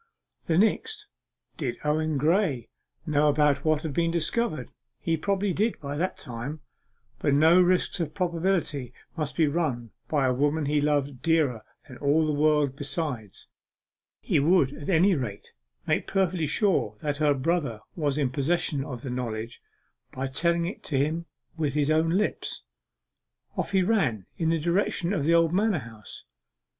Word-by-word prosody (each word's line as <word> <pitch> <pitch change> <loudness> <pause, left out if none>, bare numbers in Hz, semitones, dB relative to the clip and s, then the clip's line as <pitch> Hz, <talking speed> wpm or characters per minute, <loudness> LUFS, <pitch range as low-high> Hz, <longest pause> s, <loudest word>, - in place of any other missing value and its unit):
The 165 - +2
next 420 - +1 0.5
did 125 -6 -3
Owen 155 0 0
Graye 150 - +1 0.4
know 150 -1 +3 0.3
what 155 0 +1
had 155 -3 -3
been 165 +3 +1
discovered? 165 - -1 0.3
He 165 - 0
probably 195 +3 0
did 215 +5 0
by 140 -1 -5
that 180 +5 -1
time, 130 +4 -6 0.6
but 140 - +2
no 160 +5 +6
risks 180 0 +2
of 160 -3 -3
probability 170 -6 -1 0.2
must 155 -4 -3
be 160 - +4
run 140 -7 -1 0.2
by 145 -3 +1
a 130 - +2
woman 145 +4 +1
he 145 +1 +1
loved 145 -3 0
dearer 155 -9 +2 0.3
than 125 -4 -11
all 150 +3 +3
the 155 - 0
world 150 -2 +2
besides. 140 - -4 0.7
He - - +1
would 145 -2 +3
at 145 +2 -7
any 185 +2 +4
rate 120 - -4 0.3
make - - 0
perfectly 185 -4 +1
sure 160 - +1
that 145 -1 -2
her 150 -1 +3
brother 135 -6 -1
was 145 -4 -1
in 140 -4 +1
possession 145 0 0
of 125 -4 -7
the 130 - -4
knowledge, 115 -2 -4 0.5
by 135 +1 -4
telling 170 +5 +1
it 185 - -6
him 155 +4 0 0.3
with 150 -3 -1
his 150 0 +2
own 160 +1 +3
lips. 195 +5 -1 0.9
Off - - -2
he 190 -2 +3
ran 155 - +1
in 165 -1 +1
the 165 - +2
direction 175 +2 0
of 150 -8 -1
the 165 +2 +4
old 165 0 +3
manor 205 0 +2
house. 115 -5 -10
155 Hz, 160 wpm, -27 LUFS, 140-170 Hz, 0.9 s, no